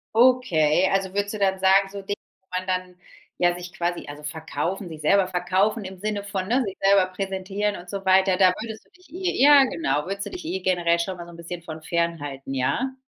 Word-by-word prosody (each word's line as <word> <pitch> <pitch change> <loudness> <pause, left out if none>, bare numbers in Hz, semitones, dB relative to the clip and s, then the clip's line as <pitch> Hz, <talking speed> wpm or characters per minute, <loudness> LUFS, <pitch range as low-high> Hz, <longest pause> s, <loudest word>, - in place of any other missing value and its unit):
Okay, 190 -10 +4
also 195 -1 0
würdest 205 +1 -1
du 215 - -5
dann 190 -1 +2
sagen, 190 +1 +4
so 200 -1 -7
Dinge, 200 +1 -2 0.2
wo 190 - -47
man 185 - -11
dann, 185 -1 -2 0.4
ja, 175 0 +3
sich 175 +1 -9
quasi 175 -1 -2
also 145 +1 -8
verkaufen 160 +5 -4
sich 155 -2 -9
selber 190 +4 +3
verkaufen 190 +4 0
im 190 0 -8
Sinne 205 +1 -3
von, 195 -2 -4
ne, 250 +5 +2
sich 195 -2 -6
selber 195 -1 +5
präsentieren 195 +2 -3
und 180 +1 -11
so 195 0 -5
weiter, 190 0 +4
da 185 -1 +5
würdest 220 -1 -7
du - - -31
dich 365 0 -22
eh 360 -5 -2
ja 285 -1 +8
genau 150 - -1
würdest 195 +1 -4
du - - -6
dich 360 -3 -8
eh 190 - -2
generell 175 -2 +1
schon 185 +1 -3
mal 175 - -8
so 175 - -12
'n - - -13
bisschen 170 0 -7
von 160 -1 -8
fernhalten, 150 -5 -3
ja? 235 - 0
190 Hz, 225 wpm, -24 LUFS, 170-200 Hz, 0.4 s, ja